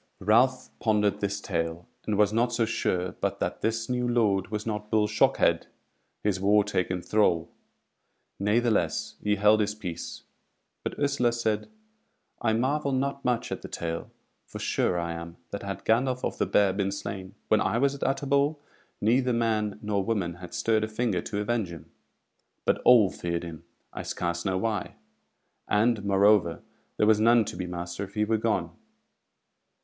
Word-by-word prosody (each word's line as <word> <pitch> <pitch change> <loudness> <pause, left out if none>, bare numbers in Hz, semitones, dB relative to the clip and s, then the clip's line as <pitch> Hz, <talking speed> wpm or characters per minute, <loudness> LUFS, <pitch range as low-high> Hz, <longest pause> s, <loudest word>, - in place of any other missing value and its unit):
Ralph 125 +6 +3
pondered 105 -2 +2
this 100 0 -2
tale, 85 -2 -3 0.2
and 105 -2 0
was 105 0 +3
not 120 +2 +2
so 120 -1 +1
sure 90 -5 -1
but - - -1
that - - -3
this 115 0 -1
new 125 -1 -1
lord 105 -6 +2
was 105 0 -4
not 105 -1 -4
Bull 110 -1 +3
Shockhead, 105 - +2 0.6
his 100 -3 +1
wartaken 95 -3 +1
thrall; 90 -6 +2 0.9
natheless 110 +3 +1
he 105 0 +1
held 105 +2 +4
his 105 0 0
peace; 90 -6 -6 0.6
but - - -4
Ursula 140 -4 +2
said: 110 - -1 0.7
"I 110 - +2
marvel 140 +5 0
not 140 +1 -1
much 125 -2 0
at - - -4
the - - -7
tale, 85 0 -4 0.4
for - - -8
sure 90 - 0
I 85 0 -2
am, 85 +1 -8
that 100 - -4
had 100 -1 -6
Gandolf 125 +3 +2
of - - -4
the - - +1
Bear 100 -2 +3
been 100 0 -1
slain 100 -1 -6
when 110 - +4
I 105 - +1
was 140 +3 +2
at 140 - -9
Utterbol, 140 +2 +1 0.4
neither 125 +4 +3
man 110 -3 0
nor 105 -2 0
woman 95 -6 -1
had 90 -1 -9
stirred 110 -1 +1
a - - 0
finger 110 -4 -1
to 105 +1 -3
avenge 110 -3 -1
him. 80 -2 -11 0.7
But - - +2
all 115 -6 +6
feared 85 -1 -3
him, 85 -1 -8 0.3
I - - -5
scarce 85 0 -3
know 95 -1 +1
why; 105 0 -2 0.7
and, 110 0 +2
moreover, 100 -3 +3 0.3
there - - +3
was 110 -1 +5
none 115 0 +5
to - - -6
be 90 0 -4
master 85 +2 -5
if 95 - -17
he 105 0 +2
were 110 +1 +1
gone." 100 -7 0
105 Hz, 170 wpm, -27 LUFS, 95-115 Hz, 0.9 s, all